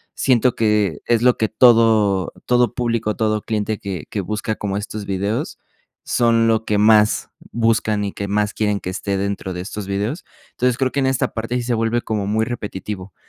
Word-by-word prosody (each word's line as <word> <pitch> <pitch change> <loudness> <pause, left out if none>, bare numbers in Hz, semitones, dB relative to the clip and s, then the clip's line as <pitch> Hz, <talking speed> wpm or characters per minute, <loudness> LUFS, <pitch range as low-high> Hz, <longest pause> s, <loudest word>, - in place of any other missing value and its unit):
siento 125 -1 +2
que 105 -7 +1
es 115 -2 +2
lo 125 0 +5
que 110 - 0
todo 110 -5 +4
todo 125 -1 +2
público, 115 -3 -1
todo 110 -1 0
cliente 110 -1 -2
que 95 -6 -5
que 105 - -2
busca 110 +3 -3
como 100 -1 -3
estos 105 0 -5
videos 100 +3 -2 0.5
son 115 -1 +2
lo 110 -1 +2
que 105 -2 0
más 105 0 +4 0.2
buscan 110 -2 +1
y 100 - -4
que 100 -1 -5
más 105 +1 0
quieren 105 -2 0
que 90 - -5
esté 100 +1 -2
dentro 100 -1 -3
de 90 - -5
estos 100 +2 -6
vídeos, 105 - -2 0.3
entonces 125 -1 0
creo 130 -1 0
que 140 - 0
en 135 - +2
esta 130 -1 0
parte 115 +2 -3
sí 125 - -2
se 120 0 -1
vuelve 115 +1 0
como 105 -4 -2
muy 110 +2 +1
repetitivo, 105 -4 -6
110 Hz, 195 wpm, -20 LUFS, 100-115 Hz, 0.5 s, lo